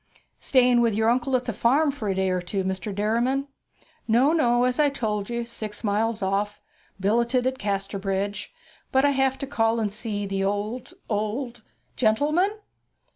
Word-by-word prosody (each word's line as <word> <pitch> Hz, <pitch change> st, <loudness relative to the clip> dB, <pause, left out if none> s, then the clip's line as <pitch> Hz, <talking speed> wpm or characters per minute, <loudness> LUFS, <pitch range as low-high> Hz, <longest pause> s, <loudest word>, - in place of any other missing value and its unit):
'Staying 250 Hz, -2 st, +4 dB
with 230 Hz, -3 st, +2 dB
your 220 Hz, +1 st, +3 dB
uncle 255 Hz, +2 st, +1 dB
at 250 Hz, 0 st, 0 dB
the 235 Hz, -, -2 dB
farm 280 Hz, +8 st, +3 dB
for 235 Hz, -7 st, -4 dB
a 190 Hz, -, 0 dB
day 190 Hz, 0 st, +1 dB
or 180 Hz, 0 st, 0 dB
two, 190 Hz, +2 st, -2 dB
Mr. 190 Hz, +2 st, -3 dB
Derriman?' 235 Hz, +7 st, 0 dB, 0.6 s
'No, 250 Hz, +7 st, +4 dB
no; 245 Hz, -6 st, +3 dB
as 250 Hz, +2 st, +1 dB
I 295 Hz, -1 st, +5 dB
told 210 Hz, -6 st, -3 dB
you, 235 Hz, 0 st, -2 dB
six 215 Hz, -2 st, -7 dB
mile 220 Hz, +2 st, +1 dB
off. 200 Hz, +2 st, -1 dB, 0.4 s
Billeted 235 Hz, +5 st, +1 dB
at 260 Hz, 0 st, -1 dB
Casterbridge. 195 Hz, -, -2 dB, 0.4 s
But 265 Hz, +1 st, +4 dB
I 285 Hz, -, +4 dB
have 265 Hz, -1 st, +1 dB
to -, -, -4 dB
call 230 Hz, -4 st, +1 dB
and 210 Hz, -2 st, -1 dB
see 210 Hz, -2 st, -3 dB
the 195 Hz, 0 st, -2 dB
old, 205 Hz, +5 st, -3 dB
old 230 Hz, +3 st, -3 dB, 0.2 s
' -, -, -43 dB
'Gentleman?' 305 Hz, -, +2 dB
230 Hz, 175 wpm, -25 LUFS, 205-255 Hz, 0.6 s, I